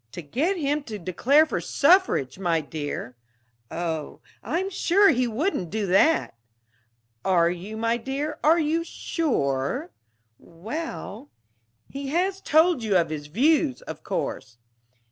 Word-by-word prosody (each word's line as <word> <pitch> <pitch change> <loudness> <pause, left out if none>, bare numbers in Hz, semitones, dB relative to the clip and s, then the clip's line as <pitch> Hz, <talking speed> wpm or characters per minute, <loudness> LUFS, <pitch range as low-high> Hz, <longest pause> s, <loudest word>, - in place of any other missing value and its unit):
"To 175 - -7
get 305 - -1
him 295 -1 0
to 215 -3 -6
declare 235 - +3
for - - -3
suffrage, 285 - +2
my 170 -3 +1
dear." 145 -4 -5 0.5
"Oh 160 -3 -4 0.2
I'm 380 +4 -2
sure 395 +2 +4
he 255 -3 +2
wouldn't 230 - -1
do 215 +2 -2
that!" 195 - +3 0.9
"Are 170 -2 +3
you, 190 +5 -7
my 230 +1 +1
dear? 275 +5 -4
Are 320 +3 +5
you 325 +1 +1
sure?" 140 - -2 0.5
"Well 230 - -7 0.3
" 115 0 -46
"He 275 0 -5
has 370 +6 0
told 320 -1 +3
you 215 -3 0
his 155 -2 -6
views, 275 - +2
of - - -8
course?" 115 - -4
235 Hz, 130 wpm, -25 LUFS, -, 0.9 s, Are